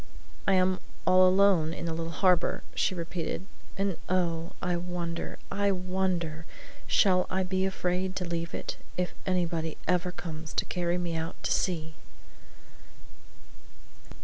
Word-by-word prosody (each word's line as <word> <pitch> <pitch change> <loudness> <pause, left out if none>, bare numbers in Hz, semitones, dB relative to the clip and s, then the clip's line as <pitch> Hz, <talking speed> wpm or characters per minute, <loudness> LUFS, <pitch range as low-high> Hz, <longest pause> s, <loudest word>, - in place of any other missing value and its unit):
"I 195 - +5
am 185 0 +3 0.3
all 185 0 +7
alone 185 -4 +4
in - - -5
the 165 - -1
little 165 0 -3
harbor," 180 +2 +3
she 185 - +1
repeated; 170 +1 -3 0.3
"and 195 -3 0
oh, 170 -2 0
I 180 -1 0
wonder, 175 -1 -3
I 200 0 +2
wonder, 180 -4 -1 0.4
shall 185 -3 +4
I 190 0 +1
be 185 +1 +1
afraid 185 0 -1
to 180 - -2
leave 170 -1 -3
it, - - -4 0.2
if 180 0 0
anybody 170 -3 0
ever 180 0 +2
comes 160 -3 -7
to - - +1
carry 175 0 0
me 175 -2 -2
out 160 +2 -3
to - - 0
sea!" 160 -4 0
180 Hz, 140 wpm, -29 LUFS, 165-185 Hz, 0.4 s, all